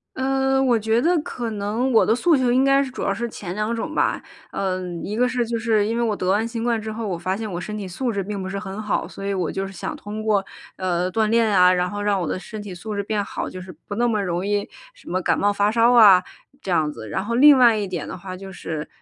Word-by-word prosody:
嗯， 270 0 +1
我 240 -2 +4
觉 225 +2 +1
得 340 +3 +3
可 240 -6 -4
能 215 +5 -1
我 225 - +5
的 220 - +3
诉 325 +4 +3
求 255 -2 +2
应 255 +2 +3
该 275 0 +4
是 265 - -6
主 - - -7
要 - - 0
是 235 +1 -2
前 190 -5 -7
2 215 +2 -1
种 310 +7 -4
吧， - - +1 0.3
嗯， 185 -3 -3
1 210 - -4
个 250 +2 +2
是 250 -1 0
就 230 0 -2
是 220 -2 +1
因 230 +1 -1
为 235 - +1
我 220 -3 0
得 185 -2 -2
完 210 +4 +2
新 230 -1 -4
冠 235 -1 +1
之 220 0 -5
后， 220 0 -4
我 180 -3 -2
发 185 +3 -2
现 215 0 -5
我 175 - -3
身 210 +3 -6
体 205 -2 -5
素 235 +7 -2
质 200 -2 -2
并 200 +1 -5
不 185 - -4
是 195 +1 -4
很 195 0 -7
好， 215 - -1
所 195 - -9
以 200 - -1
我 185 -4 -1
就 195 - -3
是 195 - -8
想 175 - -5
通 210 +1 -7
过， 210 -3 +1 0.3
呃， 180 -1 -1
锻 220 +3 +1
炼 230 +1 +3
啊， 185 -3 +5
然 180 0 0
后 205 - -5
让 205 -2 0
我 170 - -2
的 - - -2
身 210 +3 -8
体 200 -3 -8
素 210 +5 -6
质 200 - -1
变 205 0 -2
好， - - -4
就 185 - -8
是 185 0 -9 0.2
不 205 - -4
那 240 +3 +2
么 215 -3 0
容 180 0 -2
易 205 0 -1 0.2
什 - - -14
么 185 - 0
感 185 - +1
冒 205 - +3
发 205 +1 +1
烧 230 +2 +4
啊， 200 -6 +8 0.4
这 - - -7
样 155 -4 +1
子。 110 -7 -9
然 190 - -2
后 235 - -2
另 280 +3 +7
外 240 -3 +6
1 210 -2 -2
点 175 -4 -4
的 - - -6
话 185 0 -8
就 195 +1 -9
是， 155 -4 -5
210 Hz, 300 characters per minute, -22 LUFS, 190-230 Hz, 0.4 s, 啊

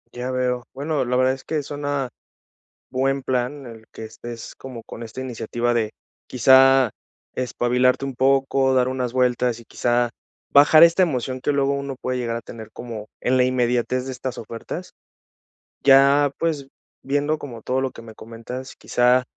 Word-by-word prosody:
Ya 125 +1 -4
veo. 125 -1 -1
Bueno, 145 0 -1
la 125 +1 -1
verdad 130 +1 +3
es 130 - -9
que 155 -2 -2
suena 145 -2 -3 0.8
buen 135 +1 0
plan, 130 +2 -2
el 115 -2 -11
que - - -8
estés 115 +1 -9
como 125 -3 -9
con - - -10
esta 115 +3 -7
iniciativa 120 -1 -2
de, 110 -2 0 0.4
quizá, 130 0 +5 0.5
espabilarte 125 +1 +1
un 135 -2 -4
poco, 135 0 +2
dar 130 -1 +3
unas 125 -2 -3
vueltas, 125 -2 +1
y - - -15
quizá, 120 +1 0 0.4
bajar 150 +3 +7
esta 170 +3 +6
emoción 130 -5 -2
que 145 - 0
luego 140 0 +1
uno 140 -1 -3
puede 130 0 -2
llegar 120 -2 -2
a 115 - -4
tener 110 -1 -10
como 115 -3 -7 0.2
en 130 +1 +2
la 125 - +4
inmediatez 125 0 0
de - - -4
estas 130 -1 -5
ofertas. 115 +10 -7 0.9
Ya, 140 +1 +6
pues, 155 -5 -2 0.3
viendo 145 +3 0
como 120 -5 -9
todo 130 +1 0
lo 135 - 0
que 115 - -12
me 110 -1 -11
comentas, 115 +4 -9
quizá, 125 +1 +2
130 Hz, 165 wpm, -22 LUFS, 120-135 Hz, 0.9 s, bajar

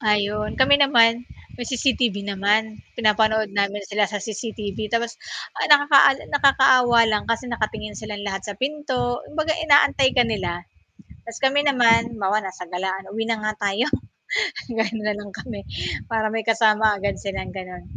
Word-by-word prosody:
Ayun, 210 -1 0
kami 285 +2 +4
naman 235 -4 +5 0.3
may 240 - -6
CCTV 240 -5 0
naman 205 +2 0 0.2
pinapanood 220 -1 +1
namin 200 0 -1
sila 205 0 0
sa 210 - -4
CCTV 215 0 -5
tapos 235 +1 -2 0.4
ay - - 0
nakaka 285 -2 +6 0.2
nakakaawa 265 -4 +4
lang 215 -2 0
kasi 230 +2 -1
nakatingin 215 -3 -4
silang 210 -1 -7
lahat 195 -1 -3
sa 205 0 -8
pinto, 260 -2 -2
kumbaga 315 +1 -1
inaantay 285 -3 +4
ka 245 - +5
nila, 180 -6 -3 0.6
tapos 230 0 -8
kami 285 +2 +2
naman, 235 -3 +3
halimbawa 205 0 0
nasa 190 -3 -7
galaan 190 +1 -4
uwi 225 +2 -3
na 225 -2 -2
nga 215 - 0 0.2
tayo 210 +6 -1 0.8
ganon 225 -1 -2
na 210 - 0
lang 205 -1 -9
kami 220 -4 -8 0.5
para 220 -2 -1
may 225 0 -2
kasama 220 -1 +3
agad 200 +1 -3
silang 195 -1 -5
gano'n, 185 -2 -9
220 Hz, 155 wpm, -22 LUFS, 205-245 Hz, 0.8 s, nakaka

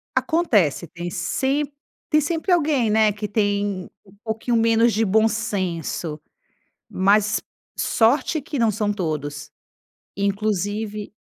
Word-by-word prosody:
Acontece 220 - +2
tem 175 +2 -6
sem 270 - -1 0.4
tem 305 - +5
sempre 325 +5 -1
alguém, 290 -9 +2
né, 215 0 +4
que 210 +1 -4
tem 205 -2 -1 0.2
um 195 0 -20
pouquinho 225 +1 -1
menos 230 +1 +4
de 220 +1 +2
bom 220 +3 +4
senso, 185 -7 -3 0.7
mas 205 +2 +2 0.4
sorte 270 +7 +2
que 285 +1 -5
não 230 -2 +3
são 210 0 -1
todos. 155 -6 -3 0.7
Inclusive 205 +1 -2
210 Hz, 115 wpm, -22 LUFS, 190-230 Hz, 0.7 s, tem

